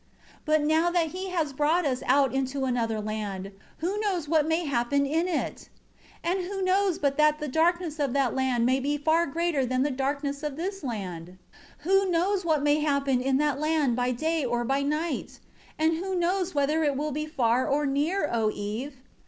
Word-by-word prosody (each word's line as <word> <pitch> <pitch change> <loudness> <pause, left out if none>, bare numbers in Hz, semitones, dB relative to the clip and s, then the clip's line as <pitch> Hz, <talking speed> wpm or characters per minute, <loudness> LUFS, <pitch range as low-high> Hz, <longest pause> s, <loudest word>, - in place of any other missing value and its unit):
8 - - -26
But 310 -1 +3
now 320 +3 +3
that 345 -2 +1
He 370 +3 -5
has 325 -6 -1
brought 305 +5 +2
us 255 -3 -1
out 270 0 +3
into 270 0 -1
another 230 -3 -1
land, 205 -2 -4 0.3
who 375 +6 -2
knows 375 -7 -1
what 310 -1 +2
may 325 +2 0
happen 280 +1 +1
in 320 +5 0
it? 345 -4 -3 0.5
And 355 +3 0
who 380 +1 -3
knows 375 -1 +2
but 280 -1 0
that 305 0 +4
the 300 -1 -4
darkness 325 +2 +1
of 280 -3 0
that 270 -5 +1
land 255 -3 +1
may 260 +2 +2
be 290 +2 -1
far 320 +3 +2
greater 330 -1 0
than 255 +1 0
the 290 - 0
darkness 280 +2 -2
of 300 -2 -4
this 390 +2 -4
land? 190 -9 -5 0.6
9 380 - +1
Who 390 - -1
knows 370 +3 +1
what 310 -4 +1
may 295 +1 +3
happen 280 -4 +1
in 265 +1 +1
that 290 -1 +1
land 305 -5 +1
by 250 0 0
day 315 +5 -1
or 240 -1 -1
by 270 +3 +1
night? 300 +2 -2 0.4
And 315 +1 +2
who 380 +2 -3
knows 360 0 0
whether 295 +3 +2
it 285 -3 +1
will 300 +1 -2
be 305 +2 -3
far 255 -4 +1
or 295 +1 +1
near, 295 +6 0
O 225 -2 +2
Eve? 215 +7 -5
295 Hz, 200 wpm, -27 LUFS, 265-330 Hz, 0.6 s, that